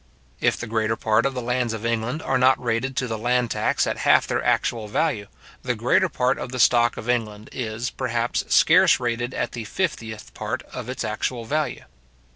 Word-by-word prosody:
If - - +2
the - - -5
greater 110 -1 0
part 110 +3 +2
of 135 - -5
the 125 - -3
lands 125 -1 0
of 110 0 -5
England 115 +6 -1
are 130 -1 +1
not 130 +1 +5
rated 125 +2 -1
to 130 - -1
the 110 -2 -4
land 120 0 +1
tax - - +1
at - - -3
half - - +4
their - - -1
actual 115 -3 0
value, 105 -3 -1 0.3
the 125 -1 -1
greater 115 +3 +2
part 125 +1 0
of 125 - -5
the 130 - -4
stock 120 -1 +4
of 110 - -7
England 110 -3 -2
is, 120 0 -4
perhaps, 120 -2 -1
scarce - - +6
rated 120 +1 -2
at 120 - -2
the 120 - -5
fiftieth 110 - -4
part - - -4
of - - -6
its 130 - -3
actual 115 +2 -3
value. 150 +5 -2
120 Hz, 200 wpm, -23 LUFS, 110-125 Hz, 0.3 s, scarce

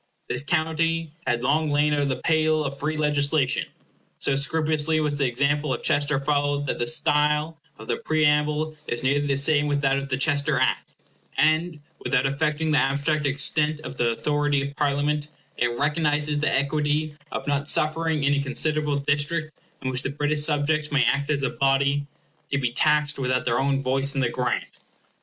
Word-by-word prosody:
This - - +2
county 165 +1 0 0.2
had 120 0 0
long 150 +4 +1
lain 145 +1 +2
out 145 - +1
of 140 -1 0
the 130 - 0
pale 155 0 +1
of 140 0 -5
free 155 +1 -2
legislation. 145 -2 +1 0.5
So 140 - 0
scrupulously 155 +2 +1
was 150 -2 -1
the 140 - +2
example 140 +4 0
of 125 - -3
Chester 145 0 +1
followed 145 0 0
that - - -3
the 120 - -1
style 150 0 +2 0.2
of 110 - -11
the - - -1
preamble 150 0 +1
is 120 - -3
nearly 145 +2 +1
the 140 - +1
same 145 +1 +2
with 145 -1 0
that 135 -1 +2
of 140 0 -7
the 130 - 0
Chester 145 -1 +1
Act, 130 - 0 0.5
and, 155 +1 +2 0.2
without 135 -1 0
affecting 150 +3 0
the 150 - +4
abstract 140 +3 0
extent 150 +2 +1
of 130 -3 -8
the 120 - +2
authority 145 +3 0
of 140 - -10
Parliament, 145 0 0 0.3
it 120 - +2
recognizes 150 0 +1
the 150 - +1
equity 150 +2 0 0.2
of - - -4
not 145 +1 -1
suffering 155 -1 0
any 140 0 +2
considerable 150 +1 -1
district 145 +3 -1 0.3
in 130 - -1
which 130 0 0
the 135 - -3
British 150 +1 0
subjects 150 0 0
may 145 -2 +3
act 140 +1 0
as 140 -2 0
a 135 - 0
body, 140 +1 +1 0.4
to 140 - 0
be 125 -3 -1
taxed 150 +2 +1
without 130 -1 0
their 115 -1 +1
own 135 0 0
voice 135 +2 0
in 135 - 0
the 125 - +1
grant. 125 +1 -3
145 Hz, 185 wpm, -24 LUFS, 140-155 Hz, 0.5 s, the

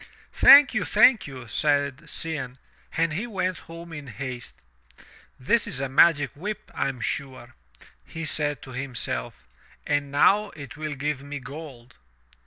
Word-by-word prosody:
"Thank 285 -1 +8
you, 215 -6 0
thank 220 +3 +4
you," 130 -3 -10
said 145 +4 0
Cianne, 150 -6 -3 0.4
and 165 -1 +1
he 205 +9 -3
went 185 -5 -2
home 165 0 -10
in 145 -2 -8
haste. 125 -1 -7 0.8
"This 225 - +1
is 135 - -1
a 135 -1 -2
magic 145 0 +4
whip, 205 +8 -6
I 140 - -1
am 130 -3 -7
sure," 130 -1 -4 0.5
he 165 0 -7
said 145 -1 +1
to 130 - -11
him 130 0 -6
self, - - -3 0.4
"and 145 -1 -1
now 200 +9 +3
it 145 -2 -10
will 155 -1 -5
give 145 0 -3
me 140 +1 -7
gold." 130 -2 -10
145 Hz, 155 wpm, -25 LUFS, 130-165 Hz, 0.8 s, Thank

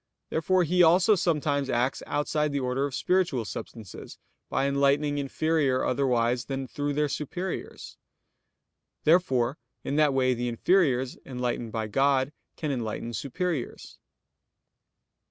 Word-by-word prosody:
Therefore 180 +3 +2
He 180 +2 +2
also 175 +5 +6
sometimes 150 -6 0
acts 125 +1 0
outside 150 +1 0
the 140 - -1
order 130 +1 -1
of 135 - -6
spiritual 175 -11 +1
substances, 105 -2 -8 0.3
by 135 - 0
enlightening 140 +1 +2
inferior 140 -1 0
otherwise 125 -2 +1
than 135 -1 -3
through 145 +1 -3
their 150 +1 +1
superiors. 175 +6 -5 1.0
Therefore 140 -6 +2 0.2
in 145 - -2
that 150 -2 +4
way 130 -1 +3
the 120 0 -3
inferiors 130 0 +1
enlightened 125 -3 -3
by 110 -1 -2
God 135 +5 +1 0.2
can 150 -2 -3
enlighten 120 -2 -4
superiors. 145 - -4
140 Hz, 120 wpm, -27 LUFS, 125-155 Hz, 1.0 s, also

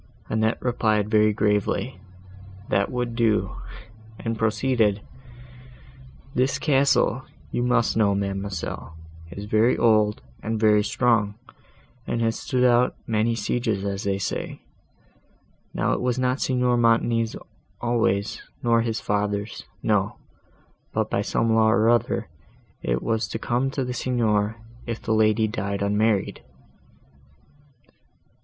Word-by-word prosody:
Annette 110 +1 +1
replied 110 -4 +1
very 110 -1 +4
gravely, 105 -3 0 0.7
that 100 - +1
would 125 -2 -2
do, 115 -3 +1 0.6
and 115 0 -3
proceeded—"This 120 - -3
castle, 135 -4 +2 0.3
you - - -1
must 125 -1 +2
know, 100 -3 +3
ma'amselle, 100 -4 -4 0.3
is 100 +4 -7
very 110 +3 +3
old, 110 -2 +3 0.2
and 110 +1 -2
very 105 -1 +4
strong, 110 -3 +1 0.7
and 115 - -1
has 115 -1 0
stood 125 -2 0
out 125 0 +4
many 115 0 +1
sieges 110 -2 -1
as 100 +1 -3
they 100 -1 0
say. 100 - -4 1.1
Now - - 0
it - - -2
was 125 0 0
not 130 +1 0
Signor 125 -1 +2
Montoni's 115 -1 +2 0.4
always, 110 -4 0 0.2
nor 115 -1 +3
his 115 -1 -2
father's; 105 +1 -2 0.2
no; 105 -2 +1 0.8
but, - - -1
by - - +1
some 115 -1 +1
law 110 0 +4
or 110 +1 +4
other, 120 -2 0 0.5
it - - -1
was 115 -1 0
to - - -4
come 120 +4 0
to 135 -1 -2
the 125 - -3
Signor, 110 -4 0 0.3
if 115 -1 -3
the 110 - -1
lady 110 0 +3
died 100 -2 -3
unmarried." 105 0 +1
110 Hz, 120 wpm, -24 LUFS, 105-120 Hz, 1.1 s, very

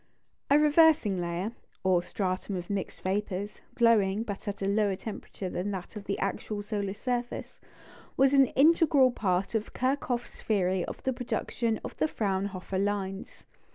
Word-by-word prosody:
A 285 - +6
"reversing 300 - +4
layer," 175 +5 -2 0.3
or 185 -2 +3
stratum 185 +1 -3
of 175 +1 -5
mixed 200 -2 -4
vapours, 200 +1 -2
glowing, 220 -3 +3
but 205 -2 -6
at 200 -1 -3
a - - 0
lower 200 -1 +2
temperature 200 -1 -7
than 180 +2 -3
that 190 +1 -6
of 205 -1 -7
the 200 - -2
actual 205 +1 -3
solar 205 -2 -3
surface, 245 +2 -4 0.6
was 270 +1 +5
an 275 -2 +6
integral 290 -3 +5
part 190 -4 0
of 220 -1 -2
Kirchhoff's 255 -2 -2
theory 190 -4 +1
of - - -7
the 260 - 0
production 235 -2 -2
of - - -7
the - - +2
Fraunhofer 195 -5 -2
lines. 195 -1 -3
205 Hz, 155 wpm, -29 LUFS, 190-240 Hz, 0.6 s, A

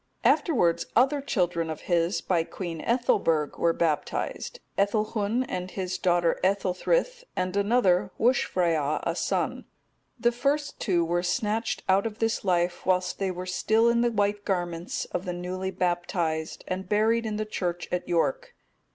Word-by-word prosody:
Afterwards 175 - +3
other 275 +4 +4
children 175 - 0
of 160 - -5
his, 175 +1 +1
by 170 -3 +1
Queen 165 -2 -6
Ethelberg, 195 - +1
were 170 - +3
baptized, 165 - -2 0.2
Ethelhun 215 +3 +1
and 180 0 -4
his 185 -1 -4
daughter 175 -2 +2
Ethelthryth, 200 - +1
and 185 +1 -1
another, 200 -3 +3
Wuscfrea, 170 - +2
a 170 - -1
son; - - -1 0.5
the 240 +1 +3
first 280 +4 -1
two 175 -6 +1
were 175 +1 0
snatched 215 +5 -1
out 195 +3 +3
of 215 -1 -8
this 225 0 0
life 175 -2 +1
whilst 185 0 0
they 195 -1 0
were 180 0 -5
still 220 +5 +2
in 235 0 +3
the 240 - +3
white 205 -1 0
garments 175 -3 -2
of 180 - -3
the 180 - -2
newly 185 +2 -4
baptized,(236) 175 -3 -1
and 185 0 -4
buried 225 +2 +2
in 215 - -2
the 215 - -2
church 175 -4 -3
at 180 0 -2
York. 485 - 0
185 Hz, 150 wpm, -27 LUFS, 175-220 Hz, 0.5 s, other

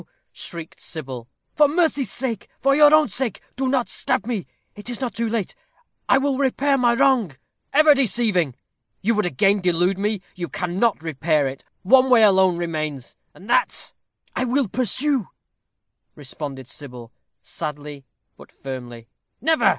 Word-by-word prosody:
shrieked 170 -2 -8
Sybil; 130 -7 -6 0.3
"for 300 -1 +5
mercy's 305 -3 +1
sake, 235 -5 -3
for 275 +1 +3
your 295 0 +7
own 310 0 +5
sake, 245 -7 -2 0.2
do 265 +1 -1
not 255 -2 +1
stab 255 -4 -1
me. 225 -6 -3 0.3
It 205 +3 -8
is 240 - -4
not 250 -5 -3
too 230 -1 -2
late. 220 -4 -2 0.6
I - - +6
will 275 0 0
repair 275 +1 +2
my 240 -3 +3
wrong!" 255 - +2 0.4
"Ever 305 +1 +6
deceiving! 215 - +2 0.5
you 230 +4 +2
would 210 -4 +1
again 195 +7 +2
delude 180 +2 +1
me. 205 -1 -1
You 175 -2 -5
cannot 185 +1 -1
repair 155 -2 0
it. 135 0 -7 0.2
One 260 +6 +5
way 240 -3 +6
alone 190 -3 +5
remains, 155 -6 -4 0.2
and 195 - -14
that - - +1 0.2
" - - -41
"I - - 0
will 255 +1 +1
pursue," 255 +2 0 0.9
responded 135 -2 -7
Sybil, 125 -5 -9 0.3
sadly, 150 -2 -6 0.3
but - - -15
firmly. 120 -4 -8 0.3
"Never!" 320 +6 +3
210 Hz, 150 wpm, -22 LUFS, 155-260 Hz, 0.9 s, your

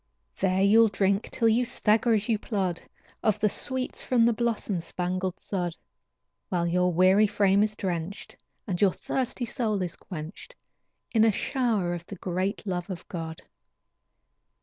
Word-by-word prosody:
There 190 +1 +2
you'll 225 +3 +6
drink 200 0 0
till 230 - +1
you 225 +3 +3
stagger 230 -1 +2
as 210 0 -1
you 225 -3 +1
plod, 190 -6 -2 0.4
Of 215 -3 +2
the 210 - +3
sweets 260 +4 -1
from 240 -3 +3
the 235 - +4
blossom 220 -5 -1
spangled 185 +2 -3
sod, 175 -4 -3 0.7
While 175 -2 0
your 180 +1 +2
weary 185 +5 +5
frame 200 -1 +3
is 215 0 +1
drenched, 180 -1 -4 0.3
And 180 -5 -3
your 195 -3 +4
thirsty 255 -1 -2
soul 220 -5 -1
is 175 - -4
quenched, 175 - -9 0.6
In 220 -2 +4
a 225 - +5
shower 220 -6 0
of 170 -1 -5
the 200 - -7
great 185 +4 -3
love 180 -2 -3
of 180 -3 -7
God. 165 -2 -6
200 Hz, 155 wpm, -27 LUFS, 180-225 Hz, 0.7 s, you'll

